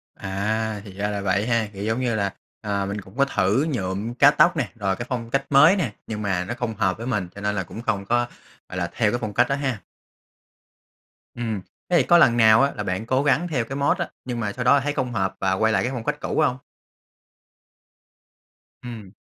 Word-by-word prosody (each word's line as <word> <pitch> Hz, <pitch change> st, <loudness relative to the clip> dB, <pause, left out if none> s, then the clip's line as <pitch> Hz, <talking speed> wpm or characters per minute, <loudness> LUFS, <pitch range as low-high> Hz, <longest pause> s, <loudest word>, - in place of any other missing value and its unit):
À, 105 Hz, +2 st, -2 dB
thì 100 Hz, -, -10 dB
ra 100 Hz, +2 st, -2 dB
là 100 Hz, -1 st, -3 dB
vậy 100 Hz, +2 st, 0 dB
ha, 115 Hz, -3 st, +1 dB
kiểu, 100 Hz, -, -6 dB
giống 110 Hz, +3 st, 0 dB
như 125 Hz, -3 st, 0 dB
là, 100 Hz, -2 st, -1 dB, 0.3 s
à, 100 Hz, -2 st, -1 dB
mình 100 Hz, +1 st, -4 dB
cũng 95 Hz, +4 st, -16 dB
có 140 Hz, -, +4 dB
thử 105 Hz, +2 st, +1 dB
nhuộm, 100 Hz, -2 st, -3 dB
cắt 140 Hz, +4 st, +6 dB
tóc 175 Hz, 0 st, +5 dB
nè, 130 Hz, -9 st, -1 dB
rồi 100 Hz, -4 st, -1 dB
cái 120 Hz, -, -6 dB
phong 115 Hz, -2 st, -3 dB
cách 135 Hz, +3 st, 0 dB
mới 150 Hz, +6 st, +7 dB
nè, 150 Hz, -, -1 dB
nhưng 105 Hz, -1 st, -4 dB
mà 95 Hz, -3 st, -1 dB
nó 120 Hz, -, -3 dB
không 120 Hz, -2 st, -4 dB
hợp 95 Hz, -3 st, 0 dB
với 115 Hz, +2 st, -6 dB
mình 105 Hz, -7 st, -1 dB
cho 100 Hz, -, -8 dB
nên 105 Hz, 0 st, -1 dB
là 95 Hz, -, -1 dB
cũng 110 Hz, -, -9 dB
không 100 Hz, -4 st, -1 dB
có, 120 Hz, +3 st, +1 dB, 0.4 s
gọi 95 Hz, -, -6 dB
là, 90 Hz, -2 st, -1 dB
theo 105 Hz, -3 st, +2 dB
cái 120 Hz, -, -1 dB
phong 110 Hz, -2 st, -4 dB
cách 120 Hz, +3 st, +3 dB
đó 140 Hz, -, +2 dB
ha. 135 Hz, -5 st, -2 dB, 1.5 s
Ừm, 115 Hz, -4 st, -3 dB, 0.3 s
thế 175 Hz, -, +4 dB
thì 150 Hz, -, +4 dB
có 175 Hz, -, +7 dB
lần 120 Hz, -8 st, +5 dB
nào 110 Hz, 0 st, +6 dB
á 140 Hz, 0 st, +3 dB
là 105 Hz, -, -3 dB
bạn 95 Hz, +3 st, -3 dB
cố 130 Hz, +3 st, +1 dB
gắng 145 Hz, +4 st, +2 dB
theo 130 Hz, -9 st, -1 dB
cái 135 Hz, -, -6 dB
mốt 145 Hz, +5 st, +2 dB
á, 175 Hz, -, -3 dB, 0.2 s
nhưng 125 Hz, -2 st, -3 dB
mà 105 Hz, -3 st, -2 dB
sau 125 Hz, -, -4 dB
đó 140 Hz, -, +6 dB
thấy 145 Hz, +2 st, -2 dB
không 130 Hz, -4 st, -2 dB
hợp 95 Hz, -3 st, -1 dB
và 95 Hz, -1 st, +1 dB
quay 110 Hz, +3 st, +2 dB
lại 95 Hz, -, +2 dB
cái 125 Hz, -, -1 dB
phong 120 Hz, -3 st, -4 dB
cách 150 Hz, +4 st, -2 dB
cũ -, -, -1 dB
hông? 130 Hz, -5 st, +2 dB, 2.3 s
Ừm. 115 Hz, -6 st, -8 dB
115 Hz, 240 wpm, -23 LUFS, 100-130 Hz, 2.3 s, mới